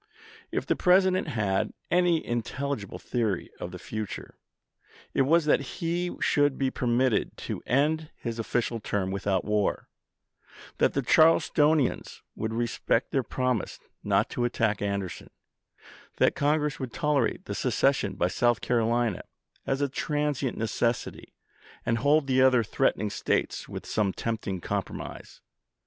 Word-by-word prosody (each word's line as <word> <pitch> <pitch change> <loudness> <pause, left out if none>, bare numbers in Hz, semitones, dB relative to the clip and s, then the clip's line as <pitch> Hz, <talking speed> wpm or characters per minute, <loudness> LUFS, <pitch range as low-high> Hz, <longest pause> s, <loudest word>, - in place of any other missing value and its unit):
If - - -2
the - - +1
President 185 0 +3
had 105 -8 0 0.2
any 175 -2 +3
intelligible 120 -1 -3
theory 110 -7 -2
of - - -5
the 90 - -8
future, 110 +2 -6 0.8
it - - +2
was 160 +4 +4
that 150 - +4 0.2
he 175 +1 -1
should 145 -2 +2
be 135 -1 0
permitted 125 -1 +1
to - - -4
end 150 +4 +1
his 115 -1 -5
official 115 +1 -1
term 100 -2 -2
without 95 -1 -1
war; 105 -1 0 0.9
that - - +3
the 140 - +1
Charles 160 +5 +5
tonians 150 -3 +1
would 110 0 -3
respect 115 +1 0
their 135 - +2
promise 125 -2 -2 0.3
not - - +2
to 120 - -1
attack 110 -3 0
Anderson; 100 -3 -3 0.9
that - - +4
Congress 150 0 0
would 130 -4 -5
tolerate 150 -6 0
the - - -4
seces - - +2
sion - - -3
of 90 +1 +2
South 120 +3 +2
Carolina 115 -3 +1 0.5
as 135 +1 0
a 145 - +2
transient 145 -1 -1
necessity, 115 +1 -2 0.5
and 115 0 +1
hold 145 +4 +3
the 130 -1 +3
other 130 -2 +5
threatening 110 -2 0
States - - -1
with - - -7
some 105 -3 0
tempting 105 -5 -3
compromise. - - -5
125 Hz, 140 wpm, -27 LUFS, 110-145 Hz, 0.9 s, Charles